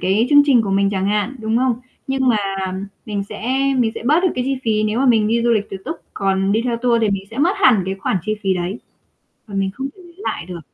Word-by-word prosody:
cái 200 +6 +2
chương 290 0 +8
trình 255 -5 +5
của 200 - -3
mình 195 0 +2
chẳng 190 -1 -1
hạn, 210 +5 0
đúng 220 +1 0
không? 255 -1 +2 0.3
Nhưng 265 -1 +1
mà 235 - +4 0.7
mình 205 -2 -2
sẽ 255 +4 -2 0.2
mình 230 -3 +2
sẽ - - -6
bớt 305 +5 +4
được 370 - +4
cái 250 - -1
chi 270 +1 0
phí 215 -1 +1
nếu 215 +2 0
mà 270 - +2
mình 220 -4 +4
đi 230 +1 +1
du 240 - +2
lịch 215 -3 +1
tự - - -4
túc, 320 - -4 0.2
còn 195 0 +1
đi 220 +2 +2
theo 240 -2 0
tour 235 -1 +1
thì 215 - +2
mình 195 -1 -2
sẽ 225 - -8
mất 335 +6 +3
hẳn 220 -7 +4
cái 190 +1 -2
khoản 195 0 -1
chi 215 - +1
phí 190 -1 +1
đấy 180 +4 -3 0.7
và 205 - -10
mình 195 -1 0
không 270 +3 -4
thể 375 - -15
lấy 345 -1 -16
lại - - -3
được. 180 -2 -7
220 Hz, 275 wpm, -19 LUFS, 195-255 Hz, 0.7 s, chương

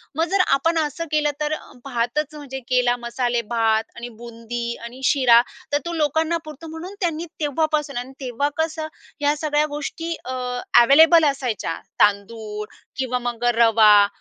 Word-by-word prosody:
मग 325 +2 +2
जर 390 0 +3
आपण 330 +5 +2
असं 315 +3 -6
केलं 300 -1 +2
तर 300 0 0
अ, - - -7
भातच 270 +4 -2
म्हणजे 275 -3 -7
केला, 250 -1 +3
मसालेभात 235 -2 0
आणि 235 +1 -7
बुंदी 235 0 -6 0.2
आणि 240 +3 -9
शिरा, 250 -4 +5 0.3
तर - - +5
तो 340 - -3
लोकांना 315 0 +1 0.2
पुरतो. 310 +1 -10
म्हणून 325 +4 -8
त्यांनी 335 -2 -1
तेव्हापासून 300 -1 -1
आणि 250 +2 -5
तेव्हा 260 +1 -1
कसं 320 -1 -2 0.3
ह्या 290 0 +2
सगळ्या 300 0 +1
गोष्टी 305 +3 -4
अ, 255 - -4 0.5
ॲव्हेलेबल 315 +6 +7
असायच्या, 260 - -1 0.3
तांदूळ 210 +1 0 0.3
किंवा 255 -1 -1
मग 240 -1 -4
अ, 240 - +5
रवा. 220 -3 +6
270 Hz, 150 wpm, -22 LUFS, 235-310 Hz, 0.5 s, ॲव्हेलेबल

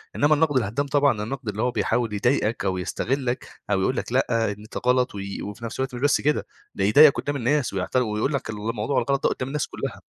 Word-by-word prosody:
إنما 145 +1 +4
النقد 145 -3 +2
الهدّام 115 +5 0
طبعًا 140 -6 +2
النقد 130 0 -5
اللي 105 +1 -3
هو 125 +1 +1
بيحاول 115 -2 0
يضايقك 110 -1 0
أو 95 -1 0
يستغلك، 125 +6 -2 0.2
أو 95 -2 +2
يقول 130 - +1
لك - - -3
لأ، 115 -4 +1
أنت 105 +2 -8
غلط 125 -3 +2
وي 100 0 -5
وفي 105 +3 -7
نَفْس 115 - -6
الوقت 130 -1 -2
مش 120 - -6
بس 145 -1 +3
كده، 150 +1 +1 0.3
ده 95 - -1
يضايقك 140 +8 +7
قُدّام 145 - -2
الناس 140 0 0
ويعت 95 +3 -3
ويقول 120 +2 +1
لك 140 - -3
الموضوع 110 +4 -2
الغلط 140 -1 -1
ده - - +5
قُدّام 130 - -3
الناس 150 +2 -2
كلها. - - -6
120 Hz, 220 wpm, -24 LUFS, 105-140 Hz, 0.3 s, يضايقك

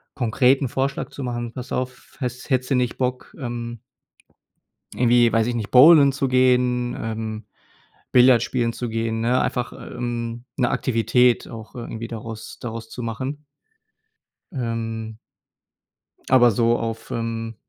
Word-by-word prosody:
konkret 130 +3 +3
'n 135 - -1
Vorschlag 135 +2 -2
zu 140 - -7
machen: 120 -1 -4
„Pass 125 -1 -8
auf, 130 0 -5
häss 125 +1 -5
hättest 130 0 0
du - - +4
nicht 125 -1 0
Bock, 125 -1 -3
ähm 120 -3 -5 1.1
irgendwie, 120 -1 +4
weiß 115 0 +2
ich 120 - -1
nicht, 110 -3 -3
Bowlen 140 +1 +8
zu 135 0 -1
gehen, 125 -1 +2
ähm, 110 -1 -4 0.7
Billard 125 -1 +6
spielen 120 -2 -1
zu 120 - -4
gehen?“ 115 0 -2
Ne, 125 +3 +2
einfach, 125 -1 -2
ähm, 120 -1 -5
'ne 125 -2 +2
Aktivität 120 +1 +2
auch 110 -1 -10
irgendwie 115 -1 -6
daraus 115 -1 -8
daraus 115 -1 -6
zu 125 - -7
machen. 130 +6 -4 1.1
Ähm. 115 -4 -4 1.1
Aber 125 -2 +6
so 115 +2 +2
auf, 115 -1 -5
ähm 115 -1 -3
120 Hz, 140 wpm, -22 LUFS, 115-125 Hz, 1.1 s, Bowlen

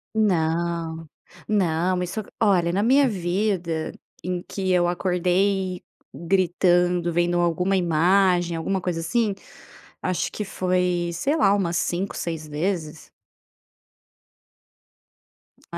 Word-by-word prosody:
Não. 165 -4 0 0.4
Não, 180 -2 +1
isso 180 +5 -4 0.2
olha, 180 -6 +3
na 200 +3 +1
minha 270 +4 +4
vida 180 -4 -1 0.3
em 180 0 -3
que 190 -1 -4
eu 175 -1 +3
acordei 185 +1 0 0.3
gritando 175 -1 +1
vendo 175 +1 +1
alguma 180 +3 +1
imagem, 175 0 +2
alguma 190 +4 -1
coisa 175 -2 -2
assim, 205 +6 0 0.7
acho 185 -1 -1
que 210 - -4
foi, 180 -2 0
sei 275 - 0
lá, 200 -11 +4
umas 175 -4 0
5 185 +3 -2
6 160 -2 -4
vezes. 160 0 -3 2.6
É. - - -3
180 Hz, 105 wpm, -24 LUFS, 170-195 Hz, 2.6 s, minha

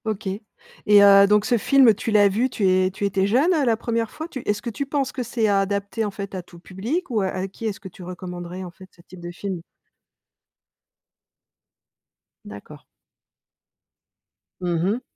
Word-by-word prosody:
OK 215 -2 -3 0.6
et 205 -1 +7
heu, 200 0 +7
donc 210 0 +3
ce 240 - +2
film 260 0 +5
tu 225 - -4
l'as 205 -1 +5
vu, 225 +7 0
tu 205 -5 0
es 185 0 +3
tu 200 +2 -3
étais 195 -1 +1
jeune, 270 - +3
heu, 300 -5 +1
la 230 -2 +2
première 230 -1 -2
fois? 315 - -7
Tu 295 -6 -7
est-ce 210 0 -1
que 235 - -4
tu 280 +5 -4
penses 275 -1 -1
que 255 - -4
c'est 230 -1 -1
adapté 200 +2 0
en 205 - -3
fait 200 0 -7
à 185 - -4
tout 170 0 -16
public 230 - -4
ou 220 -3 +1
a 190 - 0
avec 185 0 -4
qui 225 - -9
est-ce 210 -3 -3
que 195 - -10
tu 185 0 -12
recommanderais 180 0 -7
en 180 - -8
fait 190 +1 -15
ce 170 - -19
type 185 +1 -14
de 175 0 -7
film? 185 0 -5 2.8
D'accord. 105 0 -11 1.8
Mmh 175 -2 -1
mh. 215 +6 0
200 Hz, 190 wpm, -23 LUFS, 185-230 Hz, 2.8 s, et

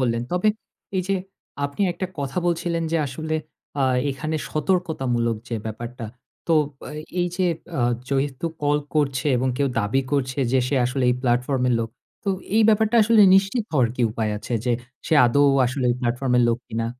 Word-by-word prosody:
বললেন। 120 -2 +1
তবে 180 +4 +2 0.5
এই 185 - +1
যে, 195 - +2 0.5
আপনি 140 +6 -5
একটা 185 +2 -4
কথা 140 +5 -2
বলছিলেন, 170 0 0
যে - - +3
আসলে 155 +4 -4 0.5
আ - - +3 0.3
এখানে 155 +4 -3
সতর্কতামূলক 140 - 0
যে 115 - -3
ব্যাপারটা। 115 +2 -6 0.4
তো 165 - +2 0.3
বা - - -9 0.3
এই 175 - +1
যে 185 - +1 0.3
আ - - +1 0.3
যেহেতু 140 +2 -1 0.2
কল 145 0 +2 0.2
করছে 140 -2 +1
এবং 130 +2 0
কেউ 140 -1 +2
দাবি 105 +6 +1
করছে 130 -1 0
যে 130 - +4
সে 140 - 0
আসলে 125 +1 0
এই - - +2
প্লাটফর্ম 125 +1 +1
এর 120 - +3
লোক। 115 - -2 0.4
তো - - -2 0.3
এই 225 - +6
ব্যাপারটা 220 +2 +3
আসলে 220 0 +5
নিশ্চিত 195 +4 +2
হওয়ার 130 -6 +3
কি 125 - 0
উপায় 110 -1 -2
আছে 120 - -7
যে, 125 - +2 0.3
সে - - +2
আদৌ 140 +4 +3 0.2
আসলে 130 +1 -2
এই - - +1
প্লাটফর্ম 125 +1 -1
এর - - +5
লোক 115 - +1
কিনা? 115 +1 -2
135 Hz, 185 wpm, -23 LUFS, 125-165 Hz, 0.5 s, এই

